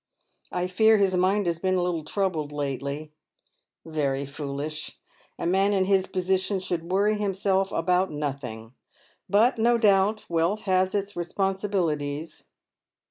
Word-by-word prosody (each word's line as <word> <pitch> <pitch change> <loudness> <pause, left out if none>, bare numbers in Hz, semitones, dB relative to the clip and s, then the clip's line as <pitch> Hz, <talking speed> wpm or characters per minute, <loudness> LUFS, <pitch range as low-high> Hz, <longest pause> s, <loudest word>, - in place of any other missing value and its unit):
I 180 0 -1
fear 220 +4 +4
his 195 -2 +2
mind 190 +3 +2
has 170 -1 -1
been^ 185 +1 +1
a - - +1
little 175 -3 -1
troubled 160 -4 -2
lately. 145 +1 -4 0.7
Very 140 -4 -1
foolish. 145 +2 -5 0.4
A - - -4
man 195 +3 +2
in 190 -1 +2
his 190 -1 +2
position 190 +1 0
should 175 -2 -4
worry 205 +2 +2
himself 195 -1 0
about 185 +1 +1
nothing. 130 -6 -5 0.6
But 225 +4 +3
no 235 +1 +4
doubt 210 -1 +3
wealth 170 +5 0
has 185 -1 +1
its 200 0 -2
responsibilities." 175 -5 -2
185 Hz, 135 wpm, -26 LUFS, 155-195 Hz, 0.7 s, fear